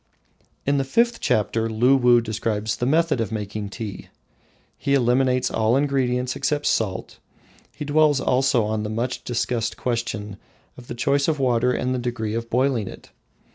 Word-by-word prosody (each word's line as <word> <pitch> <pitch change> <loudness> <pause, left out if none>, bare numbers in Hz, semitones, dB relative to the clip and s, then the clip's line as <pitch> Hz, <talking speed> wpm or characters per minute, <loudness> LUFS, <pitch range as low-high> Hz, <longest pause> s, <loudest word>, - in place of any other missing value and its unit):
In 140 0 +2
the - - +1
fifth 235 - +1
chapter 115 +1 0
Luwuh 120 +1 +4
describes 110 -1 -2
the 125 - -1
method 155 -3 +2
of 110 - -3
making 105 -1 -4
tea. 105 -1 -7 0.7
He 140 - 0
eliminates 125 0 +2
all 110 +3 +2
ingredients 130 -3 0
except 145 -1 -1
salt. 95 -4 -1 0.6
He 150 - -5
dwells 150 -1 +3
also 130 -2 +2
on 110 0 -1
the 105 - -4
much 115 +4 -3
discussed 115 -1 -2
question 115 -4 -3 0.4
of 125 -1 -13
the - - -6
choice 140 +3 +1
of 160 -2 +1
water 125 -1 +2
and 125 0 -1
the 130 - -1
degree 120 -3 -3
of 115 0 -4
boiling 125 -4 +1
it. - - -11
125 Hz, 160 wpm, -23 LUFS, 110-135 Hz, 0.7 s, Luwuh